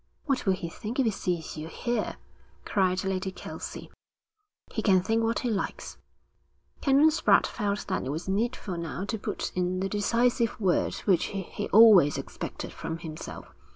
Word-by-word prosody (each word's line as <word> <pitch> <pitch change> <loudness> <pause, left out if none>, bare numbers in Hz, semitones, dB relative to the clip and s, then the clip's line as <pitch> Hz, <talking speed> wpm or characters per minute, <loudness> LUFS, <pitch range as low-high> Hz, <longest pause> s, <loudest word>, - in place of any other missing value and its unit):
'What 275 -7 -1
will 190 - +5
he 185 -2 -4
think 220 +7 -6
if 265 - +4
he 225 - +3
sees 175 -5 -3
you 155 +1 -5
here?' 235 +6 -2 0.5
cried 190 -2 +1
Lady 190 0 -2
Kelsey. - - -8 0.8
'He - - -1
can 190 -3 +5
think 225 +3 +1
what 225 +1 +1
he 245 - -1
likes.' 200 - -4 0.8
Canon 280 +3 +5
Spratte 320 - +4
felt 205 -2 -2
that - - -1
it - - -3
was 155 +6 -4
needful 205 -2 -1
now 170 +3 -4
to 220 +1 -3
put - - -3
in 180 0 -1
the 190 - 0
decisive 230 +3 +1
word 190 -4 +1
which 185 -5 +3
he 195 -3 -5
always 205 -9 +7
expected - - -6
from 160 - -5
himself. 160 -2 -8
195 Hz, 165 wpm, -28 LUFS, 180-230 Hz, 0.8 s, always